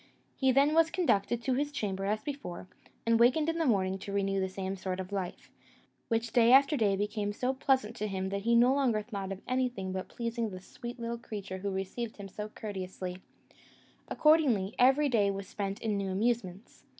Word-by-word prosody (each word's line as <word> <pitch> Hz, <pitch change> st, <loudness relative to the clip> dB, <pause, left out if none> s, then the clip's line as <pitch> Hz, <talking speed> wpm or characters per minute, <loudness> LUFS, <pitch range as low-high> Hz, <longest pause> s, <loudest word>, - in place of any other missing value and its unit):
He 265 Hz, -1 st, +3 dB
then 280 Hz, +3 st, +4 dB
was 325 Hz, 0 st, +5 dB
conducted 240 Hz, -, +1 dB
to 260 Hz, -, +1 dB
his 290 Hz, +3 st, 0 dB
chamber 195 Hz, -8 st, -3 dB
as 215 Hz, +2 st, -1 dB
before, 275 Hz, -12 st, -6 dB, 0.4 s
and 230 Hz, 0 st, +3 dB
wakened 265 Hz, +7 st, +4 dB
in 330 Hz, 0 st, -1 dB
the 325 Hz, -, +1 dB
morning 190 Hz, -4 st, +1 dB
to 200 Hz, -, -7 dB
renew 195 Hz, -1 st, 0 dB
the 190 Hz, 0 st, -1 dB
same 190 Hz, 0 st, -4 dB
sort 185 Hz, -1 st, -4 dB
of 185 Hz, +1 st, -6 dB
life, 190 Hz, -3 st, -5 dB, 0.6 s
which 230 Hz, 0 st, -1 dB
day 235 Hz, -1 st, +5 dB
after 275 Hz, +3 st, +6 dB
day 210 Hz, -6 st, +2 dB
became 205 Hz, +1 st, -2 dB
so 250 Hz, +5 st, -1 dB
pleasant 260 Hz, -4 st, +1 dB
to 215 Hz, -, -2 dB
him 190 Hz, -1 st, -3 dB
that 200 Hz, 0 st, -2 dB
he 235 Hz, +3 st, +2 dB
no 245 Hz, +2 st, +6 dB
longer 245 Hz, -6 st, +1 dB
thought 200 Hz, -4 st, -5 dB
of 195 Hz, 0 st, -6 dB
anything 250 Hz, -7 st, -1 dB
but 190 Hz, -, -2 dB
of -, -, -29 dB
pleasing 230 Hz, -1 st, -3 dB
the 185 Hz, -2 st, -7 dB
sweet 240 Hz, +6 st, -9 dB
little 235 Hz, 0 st, -4 dB
creature 200 Hz, -5 st, -6 dB
who 200 Hz, +1 st, -2 dB
received 195 Hz, +4 st, -4 dB
him 200 Hz, -1 st, -7 dB
so 210 Hz, +2 st, -6 dB
courteously: 185 Hz, -3 st, -6 dB, 0.9 s
accordingly, 265 Hz, -11 st, +3 dB
every 270 Hz, +4 st, +5 dB
day 215 Hz, -6 st, +3 dB
was 195 Hz, -1 st, -4 dB
spent 200 Hz, -1 st, -4 dB
in 215 Hz, -2 st, 0 dB
new 195 Hz, -1 st, -2 dB
amusements. 200 Hz, -1 st, -2 dB
215 Hz, 200 wpm, -31 LUFS, 195-250 Hz, 0.9 s, after